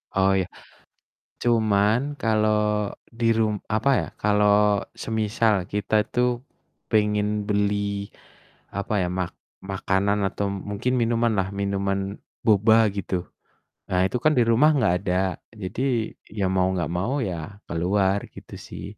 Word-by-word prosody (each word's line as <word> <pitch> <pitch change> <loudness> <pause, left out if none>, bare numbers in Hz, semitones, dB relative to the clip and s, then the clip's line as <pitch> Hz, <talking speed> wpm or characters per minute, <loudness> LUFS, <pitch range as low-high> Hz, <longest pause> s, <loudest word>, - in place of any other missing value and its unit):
Oh, 95 0 +4
ya. 90 - -1 1.0
Cuman, 110 -2 +3 0.2
kalau 105 -2 +1 0.3
di 115 - +1
rum 110 -1 +2 0.2
apa 110 +6 +2
ya, - - -4 0.2
kalau 105 -1 +4 0.2
semisal 110 0 +1 0.2
kita 105 +1 -2 0.2
tuh, 125 0 +2 0.6
pengen 105 -1 +1
beli, 100 -1 0 0.7
apa 100 +2 -2
ya, - - 0
mak 90 -2 -1 0.4
makanan, 95 +2 +1
atau 100 - -3 0.2
mungkin 125 +5 -1
minuman 115 0 +2
lah, 95 0 +1
minuman 100 0 0 0.5
boba 110 +1 +5 0.2
gitu. 95 -1 -3 0.8
Nah, 90 - +1
itu 125 - -2
kan 155 - +4
di 120 - +6
rumah 120 +7 +5
nggak 110 -9 +3
ada, 90 0 -2 0.5
jadi 95 +7 -4 0.6
ya 100 - 0
mau 90 -1 +3
nggak 85 -2 -2
mau 100 +9 -1
ya 90 - -3 0.3
keluar, 95 +4 +1 0.2
gitu - - -12
sih. - - -8
105 Hz, 130 wpm, -24 LUFS, 100-110 Hz, 1.0 s, di